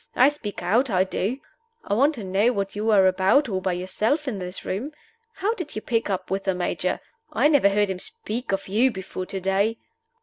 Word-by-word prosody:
I 260 +3 +6
speak 215 -11 -7
out 235 +9 +2
I 185 -3 +3
do. 195 +5 -2 0.5
I - - -2
want 280 +8 +3
to 225 - -7
know 195 +5 +2
what 200 -2 -3
you 215 +2 -1
are 200 -3 +6
about 190 +10 +4
all 190 -4 -2
by 185 -1 0
yourself 215 - -1
in 215 -7 -2
this 180 0 -6
room? 245 +11 -3 0.4
How 410 +4 0
did 350 -9 -6
you 215 - -3
pick 230 -3 0
up 190 -1 -3
with 195 0 -1
the 190 -2 +1
Major? 180 - -1 0.3
I - - +3
never 285 -9 +5
heard 205 0 +2
him 185 - -4
speak 225 +6 -5
of 195 0 -1
you 225 +7 +3
before 190 -3 -6
to 195 - -3
day." 195 +4 +1
205 Hz, 215 wpm, -24 LUFS, 190-245 Hz, 0.5 s, I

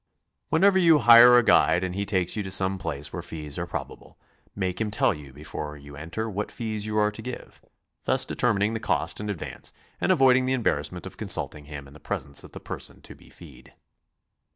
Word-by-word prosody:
Whenever 190 +4 +4
you 165 -3 +6
hire 120 -1 +8
a 120 - +5
guide 90 -4 +4
and 90 -1 -3
he 100 +1 -3
takes 95 -3 0
you 105 - -1
to 95 - -5
some 95 0 0
place 75 -4 -4
where - - -4
fees 75 0 -6
are 85 - -3
probable, - - -7 0.4
make 95 0 -2
him 110 - 0
tell 105 - +2
you 75 -3 -11
before 75 +1 -7
you 70 0 -12
enter 85 +9 -5
what 105 -1 -4
fees 110 -2 -4
you 110 0 -2
are 105 0 +3
to 105 - -8
give, 125 +2 -8 0.4
thus - - +1
determining 105 -2 +1
the 115 - -2
cost - - -1
in 105 0 -4
advance 100 -6 -5 0.3
and - - +2
avoiding 130 -1 +4
the 130 - +1
embarrassment 125 -3 -1
of - - -9
consulting 75 -1 -2
him 70 -1 -9
in 70 - -16
the 80 - -14
presence 70 -2 -2
of - - -13
the - - -8
person - - -8
to - - -10
be - - -19
feed. - - -15
100 Hz, 210 wpm, -26 LUFS, 75-115 Hz, 0.4 s, hire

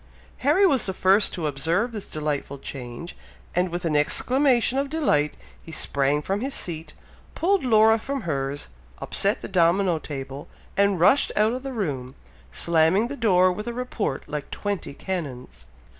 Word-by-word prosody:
Harry 300 +9 +4
was 275 - +2
the 190 - -3
first 195 +3 +3
to 170 - -4
observe 165 - 0
this 210 -3 -7
delightful 150 -2 -3
change, 135 +4 -7 0.4
and 180 +1 +1
with 175 +1 -4
an 155 -2 0
exclamation 255 - +2
of 280 0 -2
delight, 210 - +1 0.3
he 165 - -11
sprang 145 -1 +1
from 195 +5 -1
his 270 +2 -3
seat, 165 -2 -5 0.4
pulled 385 +1 +2
Laura 220 -2 +5
from 275 +4 -4
hers, 140 -5 -3 0.3
upset 200 +2 0
the - - -4
domino 175 -1 +2
table, 135 -1 -7 0.3
and 200 -2 +2
rushed 225 +11 +4
out 215 +2 +3
of 255 - -4
the 270 0 -5
room, 140 - -3 0.4
slamming 170 +7 +2
the 285 - -4
door 185 -7 +4
with 210 +5 -5
a 240 - -2
report 235 - -3
like 150 -2 -5
twenty 200 -8 -4
cannons. 125 - -6
185 Hz, 160 wpm, -24 LUFS, 150-230 Hz, 0.4 s, Laura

